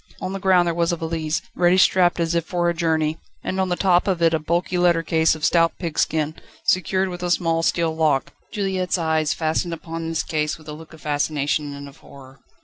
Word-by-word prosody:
On 185 - -4
the 195 - -4
ground 185 -2 +4
there 170 - 0
was 170 0 +1
a - - 0
valise, 160 -1 -3
ready 180 +1 +3
strapped 180 -2 +4
as 165 0 0
if 170 -1 +1
for 175 +1 -1
a 170 - +2
journey, 160 -2 0 0.2
and 190 - -3
on 190 - -1
the 180 - +1
top 180 0 +2
of 185 -3 +1
it 165 -1 +3
a 160 - +2
bulky 170 +4 -1
letter 170 -2 +3
case 160 0 +2
of 155 - -3
stout 165 -1 +3
pigskin, 155 -2 -1 0.3
secured 185 +2 +1
with 175 -1 -7
a 180 - -2
small 165 -2 +1
steel 165 -1 0
lock. 155 -4 +1 0.2
Juliette's 190 -3 -1
eyes 160 -2 0
fastened 165 +1 -1
upon 165 0 -6
this 165 - -1
case 150 -1 -2
with 155 -1 -18
a 150 - -6
look 160 +1 -12
of 160 - -14
fascination 145 0 -1
and 140 0 -9
of 140 - -14
horror. 135 -1 -15
165 Hz, 225 wpm, -22 LUFS, 155-175 Hz, 0.3 s, ground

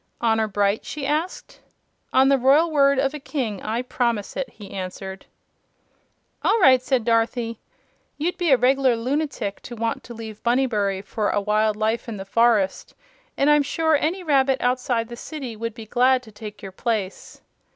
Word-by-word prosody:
"Honor 225 -2 +2
bright?" 205 0 0
she 295 -3 -5
asked. 310 +6 -3 0.5
"On 265 +1 +5
the 275 -1 +4
royal 290 +6 +4
word 280 -2 +4
of 270 +1 +1
a 300 - -5
King 250 -8 -3
I 230 +3 -2
promise 235 -4 -1
it!" 270 -2 -3
he 205 -3 -13
answered. 190 0 -7 1.1
"All 455 - +2
right," 260 -8 +6
said 255 -3 0
Dorothy. 230 0 0 0.6
"You'd 340 +4 -1
be 350 -2 -1
a 265 - +6
reg'lar 260 0 +3
lunatic 250 -4 -2
to 240 - -9
want 230 0 -2
to 235 - -9
leave 220 -2 -9
Bunnybury 215 -6 0
for 205 +1 -2
a - - +1
wild 215 +1 +1
life 220 +3 -1
in 220 - -5
the 195 - -7
forest, 215 -2 +1 0.4
and 275 - +2
I'm 295 0 +5
sure 320 +2 +1
any 330 +6 -1
rabbit 270 -4 +2
outside 245 -2 0
the 240 - -8
city 260 -2 -7
would 230 0 -5
be 225 -2 -9
glad 255 +3 +3
to 220 - -14
take 210 0 -10
your 195 - -7
place." 205 -1 -4
240 Hz, 175 wpm, -23 LUFS, 215-275 Hz, 1.1 s, right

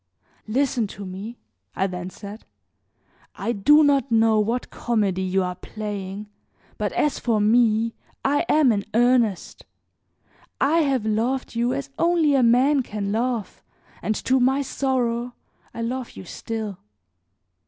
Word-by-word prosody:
"Listen 245 -1 0
to 200 0 -9
me," 200 +6 -7 0.4
I 190 - +1
then 180 -1 -4
said; 205 +3 -10 0.9
"I 235 - -2
do 295 +9 +5
not 275 -3 +2
know 225 -1 +4
what 230 +4 -1
comedy 205 -6 0
you 190 0 +1
are 180 0 -2
playing, 205 0 -6 0.5
but - - -1
as 300 - 0
for 230 -3 +1
me 225 +1 +3 0.3
I 285 +3 +2
am 295 -5 +5
in 200 -2 0
earnest. 240 -5 +2 1.0
I 310 +5 +3
have 270 -7 +1
loved 230 +5 -1
you 240 +1 0
as 275 0 -5
only 335 -3 +3
a 270 - +4
man 255 +4 +4
can 205 -4 -4
love 230 -1 -2 0.4
and 215 - -1
to 260 +4 +1
my 265 +3 +2
sorrow 245 -3 -1 0.4
I 230 - -5
love 250 +1 -3
you - - -10
still. 215 0 -5
230 Hz, 140 wpm, -23 LUFS, 210-260 Hz, 1.0 s, do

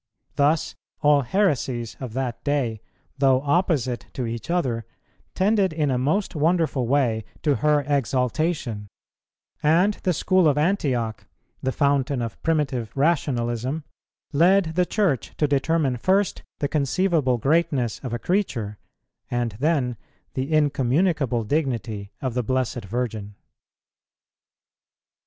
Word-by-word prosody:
Thus 145 +2 +2 0.3
all 145 -1 +5
heresies 130 - 0
of 125 -5 -6
that 125 -2 -3
day, 130 -7 -1 0.4
though 135 -2 +4
opposite 140 -5 0
to 130 - -3
each 115 +2 -5
other, 130 -10 0 0.5
tended 195 -1 +2
in 155 -3 0
a 125 - +1
most 175 +9 0
wonderful 155 -5 +1
way 120 -5 +1 0.2
to 145 -3 +2
her 150 -1 +3
exaltation; 130 -3 0 0.7
and 170 +7 +4
the 185 - +1
School 185 +1 +3
of 145 -1 +2
Antioch, 135 - 0 0.3
the 130 - 0
fountain 140 -2 +1
of 115 -2 -5
primitive 135 -8 0
rationalism, 135 -2 0 0.5
led 170 +2 +4
the 180 +1 +1
Church 155 - 0
to 150 - +2
determine 140 -1 +1
first 190 - +1 0.2
the 145 - +2
conceivable 150 -2 +1
greatness 135 -3 +1
of 130 - -6
a 120 - -1
creature, 120 - -1 0.5
and 120 -1 -1
then 135 -5 +1 0.4
the 135 +3 -3
incommunicable 145 -3 +2
dignity 115 -6 -2
of 130 -3 -1
the 125 - 0
Blessed 125 -2 -1
Virgin. 110 -2 -4
140 Hz, 120 wpm, -24 LUFS, 120-160 Hz, 0.7 s, all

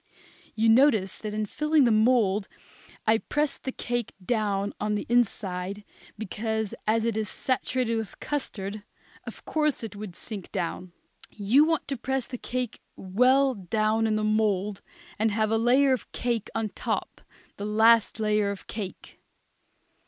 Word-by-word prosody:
You 225 +1 +2
noticed 225 -5 +4
that 210 -1 -4
in 215 0 0
filling 300 +6 +2
the 240 - +4
mould 215 -3 +3 0.6
I 220 0 +4
pressed 295 +3 -2
the 265 - -1
cake 240 -2 -3
down 205 -3 0
on 210 0 0
the 205 - -3
inside, 200 -4 0 0.3
because, 220 0 -3
as 225 +1 +2
it 230 -2 0
is 215 -1 -1
saturated 255 -2 -1
with 220 -2 -3
the - - -16
custard, 215 -8 -4 0.5
of - - -9
course 300 -5 0
it 220 -3 -6
would 200 -4 -7
sink 205 -5 -8
down. 175 +1 -3 0.4
You 220 +9 +3
want 325 -1 0
to 275 - -2
press 265 +1 -2
the 250 - -7
cake 250 -2 -4
well 255 +8 +3
down 215 +2 0
in 215 - +1
the 215 - 0
mould, 210 -2 +1 0.4
and 220 +1 +3
have 215 0 0
a 225 - +3
layer 260 +4 +4
of 255 - -4
cake 235 -3 -1
on 225 -1 -1
top, - - -4 0.4
the 200 - -4
last 220 +1 +4
layer 210 -1 +2
of 200 -1 -6
cake. 205 -4 -7
220 Hz, 160 wpm, -27 LUFS, 205-245 Hz, 0.6 s, noticed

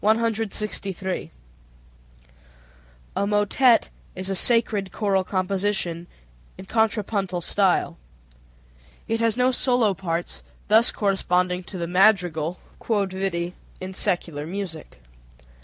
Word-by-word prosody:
A 215 -4 -1 2.0
motet 210 +4 +3 0.3
is 185 +1 -3
a - - -1
sacred 210 -3 +2
choral 195 -3 +1
composition 185 -2 -1 0.5
in - - -9
contrapuntal 205 -4 0
style. 190 - +1 1.1
It 225 0 0
has 230 0 +1
no 250 +1 +3
solo 245 -4 +2
parts, 175 -2 -4 0.3
thus 220 +3 +5
corresponding 180 -2 0
to 190 - -8
the 170 - -2
madrigal 180 -3 +2 0.3
(q.v.) 190 -4 -1 0.3
in 185 0 -6
secular 170 -6 -1
music. 170 - -6
195 Hz, 90 wpm, -24 LUFS, 180-215 Hz, 2.0 s, thus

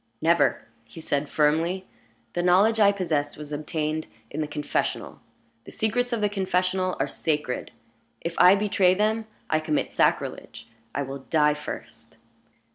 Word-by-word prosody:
"Never!" 170 +2 +2 0.2
he 115 +7 -13
said, 145 -2 -1
firmly. 165 +5 +1 0.5
"The 175 - 0
knowledge 195 +6 +4
I 200 -1 +6
possess 155 -7 -1
was 150 0 -9
obtained 155 +1 -2 0.2
in 155 - -3
the 150 - -1
confessional. 150 0 -3 0.4
The - - -10
secrets 245 +3 0
of 235 -2 -1
the 210 - +3
confessional 185 -2 0
are - - +1
sacred. 150 -5 -2 0.5
If 170 - -4
I 180 +2 +8
betray 195 -2 +3
them, 215 +2 0 0.2
I 155 - +2
commit 155 -1 -1
sacrilege. - - -1 0.3
I 140 - 0
will 135 0 -8
die 150 -2 +4
first!" 150 0 -9
170 Hz, 145 wpm, -25 LUFS, 150-195 Hz, 0.5 s, I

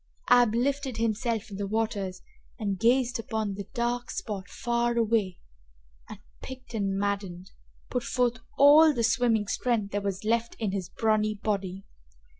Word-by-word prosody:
Ab 245 -3 +6
lifted 270 +1 -1
himself 225 -1 -1
in 195 - -6
the 200 0 -3
waters 200 -3 -2 0.3
and 200 -4 -2
gazed 240 +1 +2
upon 220 -2 -2
the 200 0 -7
dark 240 0 -1
spot 200 -3 -5
far 235 0 -1
away, 220 -5 +1 0.7
and, - - -8 0.2
piqued 260 -2 -10
and 195 -3 -1
maddened, 195 -2 -3 0.4
put 250 - 0
forth 245 -1 0 0.2
all 295 +2 +7
the 235 - 0
swimming 230 -2 +2
strength 215 -1 -1
there 205 - -1
was 200 -1 -3
left 230 +2 0
in 215 -4 -2
his 190 -3 -4
brawny 215 -1 +1
body. 195 -2 -3
220 Hz, 150 wpm, -27 LUFS, 200-240 Hz, 0.7 s, all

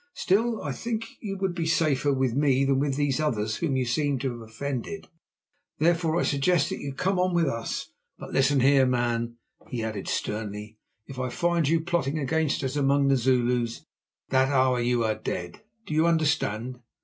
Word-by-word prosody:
Still, 225 +4 +1
I - - -2
think 225 -1 -4
you 195 -3 -4
would 190 -2 -1
be 170 -2 -2
safer 145 -4 +2
with 130 -3 +1
me 135 0 +2
than 135 -1 +2
with 140 -1 0
these 145 -1 0
others 110 -8 -1
whom 155 -6 -1
you 130 - 0
seem 145 +3 0
to 135 -2 -1
have 120 -1 -8
offended. 140 - -5 0.7
Therefore, 165 +1 +2
I - - +1
suggest 145 +2 +2
that - - -4
you 140 - -5
come 185 +7 0
on 180 -1 +1
with 170 -1 +3
us. 115 -5 -3 0.3
But - - -9
listen 135 0 +3
here, 135 0 +5
man," 120 -1 0 0.3
he 120 -2 -3
added 110 -3 -4
sternly, 105 0 -4 0.3
"if 135 -2 -9
I 130 0 -1
find 170 +1 +1
you 165 0 +2
plotting 160 -4 -1
against 150 +1 0
us 130 +1 -2
among 140 -1 +3
the 135 - +5
Zulus, 125 -2 +1 0.4
that 130 0 +3
hour 130 -2 +3
you 120 0 +1
are 110 -1 +1
dead. 90 -4 -5 0.2
Do - - -5
you 160 +2 +3
understand?" 135 -7 0
135 Hz, 185 wpm, -26 LUFS, 125-160 Hz, 0.7 s, here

